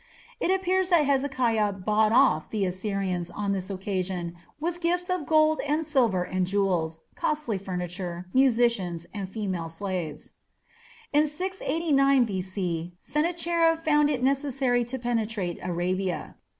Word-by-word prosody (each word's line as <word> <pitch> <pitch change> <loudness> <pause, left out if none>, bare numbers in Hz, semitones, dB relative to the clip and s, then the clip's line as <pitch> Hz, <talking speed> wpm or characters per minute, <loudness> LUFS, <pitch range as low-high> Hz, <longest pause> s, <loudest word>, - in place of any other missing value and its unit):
It - - 0
appears 375 0 +2
that 335 -5 +5
Hezekiah 255 -7 +1
"bought 215 +3 +2
off" 235 - +4
the 210 -3 0
Assyrians 185 -2 -2
on 205 -1 -2
this 190 -1 -2
occasion 185 -3 -3 0.2
with 345 +2 -3
gifts 355 +2 0
of 360 -6 -2
gold 310 0 +4
and 305 +2 0
silver 235 - +2
and 185 0 -1
jewels, 180 -5 0
costly 295 -10 -1
furniture, 180 -1 -4
musicians, 235 -10 +2
and 200 -3 -4
female 190 -6 -3
slaves. 175 -2 -5 0.8
In 300 +1 +4
689 300 -5 +2
B.C. 185 -4 -3
Sennacherib 330 +1 +1
found 295 -2 +4
it 260 -4 -1
necessary 270 -2 +1
to 255 +3 -5
penetrate 225 -7 -2
Arabia. 180 +1 -2
220 Hz, 125 wpm, -27 LUFS, 185-295 Hz, 0.8 s, that